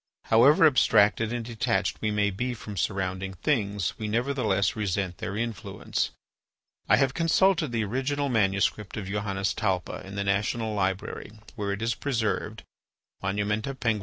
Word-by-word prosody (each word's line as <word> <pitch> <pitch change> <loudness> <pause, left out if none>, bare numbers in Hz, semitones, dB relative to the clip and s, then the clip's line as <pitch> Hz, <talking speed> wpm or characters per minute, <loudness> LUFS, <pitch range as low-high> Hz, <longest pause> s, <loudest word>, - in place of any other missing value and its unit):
However 140 +8 +7
abstracted 115 -6 +4
and 120 -1 -3
detached 110 -4 -1
we 110 - 0
may 105 -1 +1
be 120 +6 -2
from 105 -2 -8
surrounding 95 +2 -2
things, 100 - 0
we 110 - -3
nevertheless 115 -3 +1
resent 95 -4 -2
their 100 - -4
influence. 115 -2 -2 0.8
I - - +7
have 135 -2 +2
consulted 165 -1 +2
the 115 -2 0
original 135 +6 -1
manuscript 105 -3 0
of 100 - -4
Johannes 100 0 -1
Talpa 95 -5 -2
in 95 +1 -9
the 100 - -1
National 105 +3 0
Library, 95 +1 -2 0.2
where 100 -3 -2
it 100 +3 -3
is 115 +1 +1
preserved 115 -4 -2 0.6
(Monumenta 105 +6 -1
Peng. 115 -3 +1
105 Hz, 145 wpm, -27 LUFS, 100-120 Hz, 0.8 s, However